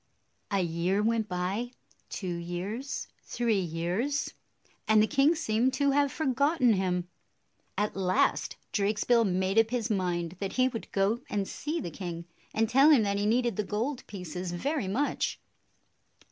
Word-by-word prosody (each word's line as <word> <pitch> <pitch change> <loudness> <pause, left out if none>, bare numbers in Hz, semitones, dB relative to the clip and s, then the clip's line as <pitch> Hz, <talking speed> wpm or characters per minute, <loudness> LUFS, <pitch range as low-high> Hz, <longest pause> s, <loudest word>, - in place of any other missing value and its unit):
A 200 -2 +1
year 175 +4 0
went 225 -1 +1
by, 190 +7 -2 0.2
— - - -35
two 185 -3 -4
years, 180 +10 -4
three 230 -4 0
years, 180 - -1 0.3
— - - -36
and 220 0 +5
the 215 - +6
king 285 +6 +3
seemed 240 -2 +1
to 280 -1 +2
have 285 0 +2
forgotten 280 -3 +2
him. 180 -2 0 0.7
At 210 +1 0
last 185 -1 +1 0.2
Drakesbill 215 +3 +2
made 190 +2 +2
up 225 0 +3
his 235 -2 -1
mind 175 -3 -1
that 195 -1 -3
he 255 0 +3
would 240 -3 -6
go 200 +5 +1
and 200 -2 -1
see 310 +3 -3
the 175 - -5
king, 170 -3 -6 0.3
and 225 0 +1
tell 270 +6 +6
him 280 -8 +6
that 200 -1 0
he 205 - +1
needed 235 -1 +1
the 210 - +1
gold 230 +7 -2
pieces 180 -2 -5
very 275 - -1
much. 255 +10 -1
210 Hz, 160 wpm, -29 LUFS, 185-250 Hz, 0.7 s, the